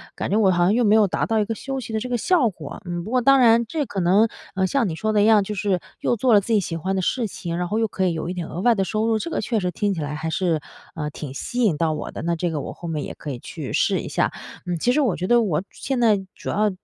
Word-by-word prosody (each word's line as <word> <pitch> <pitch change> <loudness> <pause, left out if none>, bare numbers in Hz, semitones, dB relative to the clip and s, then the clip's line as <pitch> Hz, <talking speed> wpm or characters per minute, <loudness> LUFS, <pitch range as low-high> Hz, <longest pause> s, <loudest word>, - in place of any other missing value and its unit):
感 - - -3
觉 205 - +2
我 200 -4 +4
好 175 -1 +2
像 185 +4 +3
又 240 +2 +2
没 210 +1 +5
有 215 -2 +5
达 - - -1
到 225 -1 +1
一 210 - +1
个 225 - -2
休 270 +4 -4
息 240 - -7
的 220 - 0
这 250 - -4
个 245 - 0
效 285 -1 +3
果， 165 -7 -9 0.2
不 210 - -7
过 255 0 +3
当 275 +2 +5
然， 235 -1 +5
这 295 +4 -2
可 200 - -4
能， 190 +5 +4 0.3
呃， 190 0 +2
像 260 +1 +1
你 165 - -3
说 215 +6 -1
的 210 - +4
一 - - +4
样， 215 -2 +5
就 210 - -4
是 195 -2 0 0.2
又 - - +1
做 240 +1 +2
了 205 - +8
自 225 +4 -2
己 215 - +5
喜 170 -4 -3
欢 190 +4 -2
的 190 - 0
事 235 +5 0
情， 170 -3 -5
然 180 0 -1
后 210 - -1
又 225 - +2
可 190 -2 -1
以 175 - +1
有 160 +1 -4
一 - - -2
点 175 -3 -4
额 175 - -5
外 240 +2 +4
的 195 - +1
收 215 +3 -1
入， 225 -1 +2
这 335 - -4
个 - - -2
确 230 -3 0
实 180 -2 -1
听 200 +3 0
起 175 - -5
来 150 0 -3
还 160 +2 -3
是， 165 -1 0 0.3
呃， 150 -2 -3
挺 145 -2 -7
吸 245 - -3
引 200 -9 +3
到 160 +1 +1
我 - - -5
的， - - -6
那 170 +1 0
这 175 +1 -1
个 150 -3 -2
我 - - -6
后 170 - -9
面 155 -3 -2
也 - - -6
可 150 - -7
以 125 - -6
去 - - -7
试 - - +2
一 - - -6
下。 - - 0 0.3
嗯， 175 -1 -2
其 245 - +2
实 300 - +3
我 240 -10 +1
觉 180 - -3
得 240 +2 +5
我 185 -9 +1
主 195 - -18
现 265 -2 -3
在 225 -4 +4 0.2
主 - - -7
要， 210 +1 +2
200 Hz, 355 characters per minute, -23 LUFS, 175-230 Hz, 0.3 s, 了